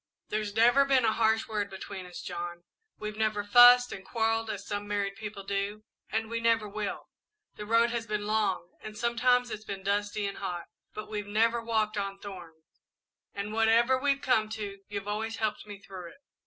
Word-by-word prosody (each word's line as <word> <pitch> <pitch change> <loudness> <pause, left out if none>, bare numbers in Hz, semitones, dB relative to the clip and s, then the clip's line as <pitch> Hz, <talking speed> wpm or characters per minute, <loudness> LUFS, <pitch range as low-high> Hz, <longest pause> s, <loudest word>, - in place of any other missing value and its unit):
"There's 210 -1 -2
never 240 +5 +6
been 270 -3 +3
a 220 - +3
harsh 220 0 +2
word 210 -2 -2
between 190 -1 -7
us, 180 - -9
John; 175 -1 -5 0.3
we've 215 0 -6
never 215 -1 +1
fussed 245 +3 +8
and 190 - -7
quarrelled 225 +1 0
as 200 -2 -5
some 205 0 -4
married 200 -1 -1
people 210 -2 -7
do, 200 +2 -3 0.3
and 220 +1 -1
we 230 +1 -2
never 230 -2 +2
will. 205 0 -5 0.4
The 210 - -8
road 230 +1 +4
has 235 -1 -3
been 210 -1 -2
long, 205 -5 0
and 215 0 -8
sometimes 245 +1 +2
it's 215 - -5
been 195 -2 -6
dusty 205 +1 0
and 200 - -4
hot, 175 -3 -4 0.3
but 215 - -6
we've 210 -1 -4
never 230 +3 +2
walked 220 -2 0
on 195 0 -3
thorns, 175 -6 -12 0.5
and 200 +1 -4
whatever 225 +3 +4
we've 275 +1 +1
come 220 -5 +2
to, 205 -2 -5
you've 200 -1 -5
always 220 +2 -2
helped 215 -1 -2
me 205 -1 -8
through 190 -3 -9
it. - - -21
215 Hz, 190 wpm, -29 LUFS, 200-225 Hz, 0.5 s, fussed